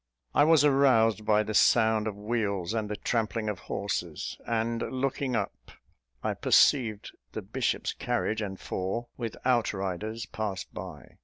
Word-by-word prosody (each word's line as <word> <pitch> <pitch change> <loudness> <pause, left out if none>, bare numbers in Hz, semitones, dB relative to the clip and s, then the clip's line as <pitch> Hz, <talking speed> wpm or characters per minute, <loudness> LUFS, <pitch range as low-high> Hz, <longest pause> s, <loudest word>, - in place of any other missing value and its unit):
I 145 - +5
was 155 -2 +5
aroused 115 -7 +4
by 105 0 +4
the 110 - -4
sound 110 -1 +4
of 105 - -3
wheels 105 -3 -1
and 110 -2 -2
the 105 - -2
trampling 110 0 -1
of 100 -4 -4
horses; 90 -5 -3
and, 115 0 0
looking 130 0 -1
up, 100 -3 -4 0.5
I - - 0
perceived 110 -7 +3 0.2
the - - -5
bishop's - - -1
carriage 110 +1 -1
and 95 -2 -5
four, 95 +6 -3
with 115 -3 -5
out 120 -4 +2
riders, 100 +4 -4
pass 105 -3 -4
by. - - -10
110 Hz, 150 wpm, -28 LUFS, 105-120 Hz, 0.5 s, I